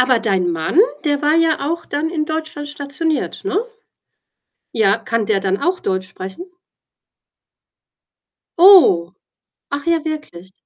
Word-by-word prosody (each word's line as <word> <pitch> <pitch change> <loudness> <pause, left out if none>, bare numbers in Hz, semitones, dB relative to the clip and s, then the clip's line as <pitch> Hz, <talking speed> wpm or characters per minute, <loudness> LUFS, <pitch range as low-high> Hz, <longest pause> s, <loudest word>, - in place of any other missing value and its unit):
Aber 255 -2 +3
dein 190 -5 0
Mann, 165 - -2 0.3
der 290 -1 0
war 300 +1 +3
ja 320 -3 +1
auch 335 - -5
dann 295 +3 -2
in 320 -2 -2
Deutschland 315 -2 -5
stationiert, 290 +2 -3
ne? 395 +1 0 1.1
Ja, 215 -2 +2
kann 230 -1 -2
der 200 -2 +1
dann 190 -1 0
auch 360 +1 0
Deutsch 185 0 -3
sprechen? 190 - -8 2.2
Oh. 330 - +6 0.6
Ach 285 +1 -4
ja, 335 -2 +1
wirklich? 190 - -7
285 Hz, 130 wpm, -18 LUFS, 195-320 Hz, 2.2 s, Oh